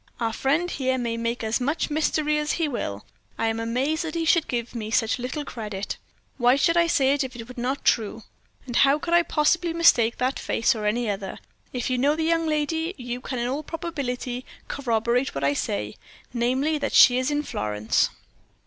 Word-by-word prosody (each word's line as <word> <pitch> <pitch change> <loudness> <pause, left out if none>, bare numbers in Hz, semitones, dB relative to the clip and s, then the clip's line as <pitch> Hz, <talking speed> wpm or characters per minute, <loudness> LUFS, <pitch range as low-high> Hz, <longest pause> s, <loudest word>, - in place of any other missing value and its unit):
Our 225 -2 -1
friend 325 +9 0
here 260 -1 0
may 235 -2 -2
make 230 +1 -2
as 220 +3 0
much 295 +4 -1
mystery 300 0 +1
as 300 0 -1
he 330 -2 0
will. 105 - -4 0.3
I - - 0
am 225 0 -2
amazed 260 +8 0
that 320 -1 -5
he 330 -1 0
should 330 0 +3
give 240 -1 -3
me 220 -3 -4
such 225 +1 +1
little 260 +4 -4
credit. 210 -6 -5 0.4
Why 245 +1 +5
should 330 +5 +2
I 340 0 +4
say 275 -4 +3
it 285 - +1
if 260 -1 -7
it 230 -1 -8
were 250 -1 -7
not 265 +3 -2
true? 220 -1 +1 0.4
And 245 -2 -2
how 275 +1 +5
could 335 +3 -3
I 345 - +7
possibly 335 +1 +1
mistake 240 -9 +4
that 255 +2 -1
face 230 - +1
for 215 -4 -1
any 235 +2 0
other? 195 -2 -3 0.3
If 250 0 -2
you 250 - +1
know 285 +4 +3
the 320 - -1
young 330 0 +1
lady, 320 +3 -1
you 245 -1 -5
can 255 - -4
in 240 0 -1
all 275 +4 -2
probability 275 -7 -4 0.2
corroborate 240 - 0
what 135 - -3
I 140 +1 +3
say 105 -6 -3 0.4
namely, 260 +6 +1
that 280 - -2
she 250 0 +7
is 255 +2 0
in 295 0 0
Florence." 105 - 0
255 Hz, 205 wpm, -25 LUFS, 230-300 Hz, 0.4 s, I